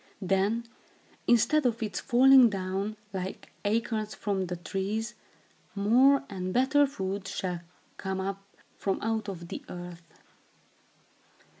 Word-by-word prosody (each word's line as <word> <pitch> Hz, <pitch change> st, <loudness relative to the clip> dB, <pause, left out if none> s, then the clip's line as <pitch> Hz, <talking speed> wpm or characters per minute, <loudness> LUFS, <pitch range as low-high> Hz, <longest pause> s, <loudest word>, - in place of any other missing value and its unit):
Then, 195 Hz, +5 st, +1 dB, 0.6 s
instead 290 Hz, +6 st, +4 dB
of 230 Hz, -1 st, -1 dB
its 215 Hz, -, -3 dB
falling 260 Hz, -1 st, +7 dB
down, 195 Hz, +2 st, -3 dB, 0.2 s
like 190 Hz, 0 st, -5 dB
acorns 215 Hz, 0 st, -1 dB
from 195 Hz, -3 st, -1 dB
the 180 Hz, -, -3 dB
trees, 195 Hz, +6 st, -3 dB, 0.6 s
more 255 Hz, +8 st, +5 dB
and 185 Hz, -2 st, -4 dB
better 280 Hz, +5 st, +4 dB
food 195 Hz, -6 st, -4 dB
shall 180 Hz, -3 st, -3 dB, 0.4 s
come 190 Hz, -1 st, -3 dB
up 195 Hz, +1 st, -3 dB, 0.4 s
from 195 Hz, -, 0 dB
out 220 Hz, -1 st, -1 dB
of 170 Hz, -3 st, -7 dB
the -, -, -6 dB
earth. 175 Hz, -1 st, -8 dB
205 Hz, 120 wpm, -29 LUFS, 190-230 Hz, 0.6 s, falling